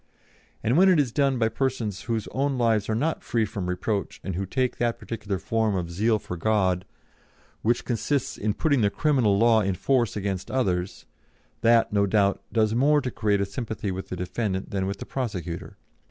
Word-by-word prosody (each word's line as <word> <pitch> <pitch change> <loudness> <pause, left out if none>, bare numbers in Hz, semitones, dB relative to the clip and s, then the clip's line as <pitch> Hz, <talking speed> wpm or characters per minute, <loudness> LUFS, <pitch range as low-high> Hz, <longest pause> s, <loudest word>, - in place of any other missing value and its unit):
And 120 +6 +2
when 190 +1 +7
it 180 -4 +5
is 135 -5 +1
done 140 0 +2
by 115 -2 +2
persons 115 -5 -2
whose 110 -2 -1
own 135 0 0
lives 115 -4 +2
are 110 - +1
not 155 +8 -1
free 115 -2 +1
from 95 -3 -4
reproach 100 +3 -2
and 95 - -3
who 95 +2 -3
take 130 +4 -1
that 120 -1 0
particular 105 -4 -4
form 110 0 0
of 85 -2 -3
zeal 110 +6 +2
for 90 - -6
God 95 -1 +1 0.8
which 120 +2 +1
consists 135 +3 -1
in 105 0 -1
putting 145 -6 +2
the 100 - +3
criminal 125 -6 +2
law 115 0 +5
in 95 -2 0
force 120 +2 +1
against 95 -2 -3
others, 95 -8 -1 0.6
that, 115 -2 +4
no 100 -1 +3
doubt, 100 0 +2
does 110 -1 +2
more 145 +5 +4
to 130 -3 -3
create 105 -3 +1
a - - +1
sympathy 105 0 -4
with 95 +1 -6
the - - -3
defendant 95 +2 -3
than 95 -1 -1
with 100 +1 -3
the - - -7
prosecutor. 95 - -4
110 Hz, 195 wpm, -25 LUFS, 95-120 Hz, 0.8 s, when